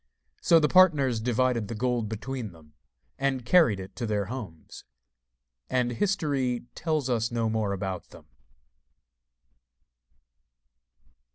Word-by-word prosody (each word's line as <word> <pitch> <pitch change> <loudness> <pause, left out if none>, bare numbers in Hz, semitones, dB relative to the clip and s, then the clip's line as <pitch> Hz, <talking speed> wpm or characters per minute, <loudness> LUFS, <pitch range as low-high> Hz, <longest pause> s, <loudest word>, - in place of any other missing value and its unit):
So 165 - +5
the 150 - +3
partners 150 -10 +4
divided 120 -1 0
the 115 - -5
gold 120 -1 -1
between 110 -1 -5
them, 75 -2 -19 0.5
and 135 -3 -1
carried 140 - +4
it 95 0 -9
to 120 - -3
their 105 -2 0
homes; 95 -12 -9 0.9
and 125 -1 +1
history 140 - 0
tells 155 -5 -1
us 115 -2 0
no 115 -2 -1
more 110 -2 -1
about 95 -1 -4
them. - - -15
120 Hz, 115 wpm, -27 LUFS, 110-135 Hz, 0.9 s, So